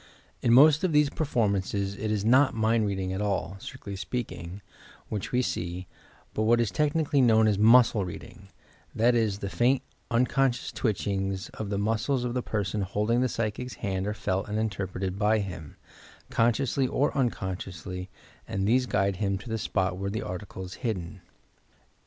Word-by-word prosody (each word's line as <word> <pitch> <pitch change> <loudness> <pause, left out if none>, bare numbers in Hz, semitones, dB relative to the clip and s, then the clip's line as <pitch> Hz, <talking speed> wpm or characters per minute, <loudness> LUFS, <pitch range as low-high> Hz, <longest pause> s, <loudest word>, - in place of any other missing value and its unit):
In 115 - +2
most 150 +6 +7
of 180 -4 +1
these 150 -1 +4
performances 100 -8 0
it 110 +1 -3
is 105 -1 -1
not 130 +3 +5
mind 110 -1 +2
reading 95 -2 -2
at 95 - -3
all, 100 -2 -1
strictly 100 +1 -8
speaking, 100 -3 -5 0.5
which 105 -3 -4
we 125 +1 +2
see, 90 -3 -3 0.5
but - - -1
what 115 +2 +4
is 115 -5 +1
tech 150 +6 +1
nically 150 -3 +2
known 110 -3 +5
as 100 -2 +1
"muscle 115 -1 +6
reading," 95 +2 -9 0.2
— - - -30
that 120 +3 +4
is, 110 -4 +1
the - - -2
faint, 130 +2 +2 0.3
unconscious 125 +1 +1
twitehings 95 -3 -2
of 110 -2 -6
the 100 - -1
muscles 115 +5 0
of 120 -1 -2
the 125 - 0
person 105 -2 -2
hold 105 +3 -1
ing 120 +1 +3
the 130 - +1
psychic 115 +3 -3
's - - -8
hand 95 -2 -2
are 105 - -2
felt 105 -3 -2
and 105 - -2
interpreted 95 -3 -3
by 105 +1 +3
him, 90 -8 -5 0.6
consciously 130 +3 +2
or 145 +3 0
unconsciously, 95 - -3 0.4
and 95 0 -1
these 125 +3 +3
guide 100 -3 +1
him 100 -1 0
to 100 +4 -10
the 110 0 -2
spot 95 -3 -1
where 100 0 -2
the 110 +2 -3
article 95 +1 -6
is 90 - -8
hidden. 95 -6 -3
105 Hz, 180 wpm, -27 LUFS, 95-120 Hz, 0.6 s, most